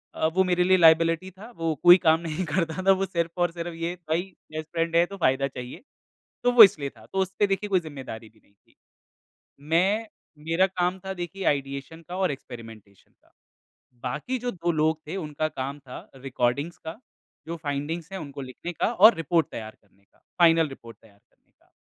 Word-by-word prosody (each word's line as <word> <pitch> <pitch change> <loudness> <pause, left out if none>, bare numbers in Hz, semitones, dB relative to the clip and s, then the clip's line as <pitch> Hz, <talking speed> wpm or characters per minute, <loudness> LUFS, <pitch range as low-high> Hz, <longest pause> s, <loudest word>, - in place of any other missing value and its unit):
अ, - - 0
वो 180 +4 +2
मेरे 180 -1 +2
लिए 185 +1 +4
लायबिलिटी 165 +1 +4
था। 195 +5 -13
वो 165 -1 -1
कोई 175 +1 +10
काम 160 0 +5
नहीं 165 +2 -3
करता 165 +2 -1
था। - - +8
वो 195 0 +2
सिर्फ़ 170 -3 -2
और 175 -1 +2
सिर्फ़, 170 0 -6
ये 165 +1 -3 0.2
भाई 160 +2 +2 0.3
बेस्ट 155 0 -5
फ्रेंड 165 0 -1
है 170 +1 +5
तो 200 +2 -10
फ़ायदा 135 -5 +2
चाहिए। 125 -2 -9 0.6
तो 245 - +4
वो 240 -2 +11
इसलिए 150 -8 +3
था। - - -18
तो 195 - 0
उसपे 190 +2 0
देखिए 195 +1 -2
कोई 190 -2 +3
ज़िम्मेदारी 135 -8 -9
भी 110 - -27
नहीं 100 - -31
थी। 100 - -34 0.9
मैं, 185 +9 +1 0.3
मेरा 165 +5 +2
काम 180 0 -1
था 190 - -2
देखिए 180 +3 -5
आइडिएशन 140 +4 -7
का 180 - -5
और 190 -3 +1
एक्सपेरिमेंटेशन 115 -7 -12
का। - - -31 0.7
बाकी 150 - -3
जो 245 +1 -3
2 175 -1 -1
लोग 155 0 +1
थे 175 - -4
उनका 155 -3 -3
काम 140 -1 -5
था 130 -2 -10 0.2
रिकॉर्डिंग्स 135 +4 -2
का 160 +4 -8 0.5
जो 170 - -4
फ़ाइंडिंग्स 150 +4 -4
है 190 - -4
उनको 140 -2 -8
लिखने 130 +7 -7
का 200 - -1
और 220 +2 +8
रिपोर्ट 165 0 +1
तैयार 110 -1 -7
करने 100 -1 -32
का, - - -34 0.2
फ़ाइनल 165 -2 +5
रिपोर्ट 115 -4 -12
तैयार 105 -3 -22
करने - - -42
का। - - -32
165 Hz, 200 wpm, -25 LUFS, 140-180 Hz, 0.9 s, वो